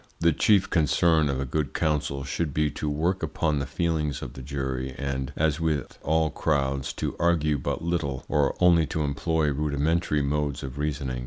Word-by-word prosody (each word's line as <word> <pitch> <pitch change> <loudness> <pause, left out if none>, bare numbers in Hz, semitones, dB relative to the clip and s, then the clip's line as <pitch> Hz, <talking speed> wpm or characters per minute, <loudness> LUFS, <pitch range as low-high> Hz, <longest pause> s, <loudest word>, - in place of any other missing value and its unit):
The 85 0 +4
chief 100 +4 +4
concern 80 -1 +3
of 65 -1 -1
a 70 - -1
good 70 +1 -2
counsel 70 -3 0
should 70 +2 -3
be 75 -1 +2
to 75 - -3
work 85 +6 0
upon 75 -1 0
the 70 - -3
feelings 80 -4 -1
of - - -7
the 65 - -9
jury, 65 -1 -3
and, 70 -1 -3
as 80 0 +1
with 80 -4 -2
all 80 0 +1
crowds, 70 -3 0
to - - -3
argue 75 -4 +2
but 75 - -3
little, 75 -6 -2
or 75 -2 +1
only 85 -3 +5
to 80 +2 -2
employ 75 +1 0
rudimentary 75 +1 0
modes 75 0 -1
of 65 +1 -6
reasoning. 70 -4 -2
75 Hz, 180 wpm, -26 LUFS, 70-80 Hz, -, only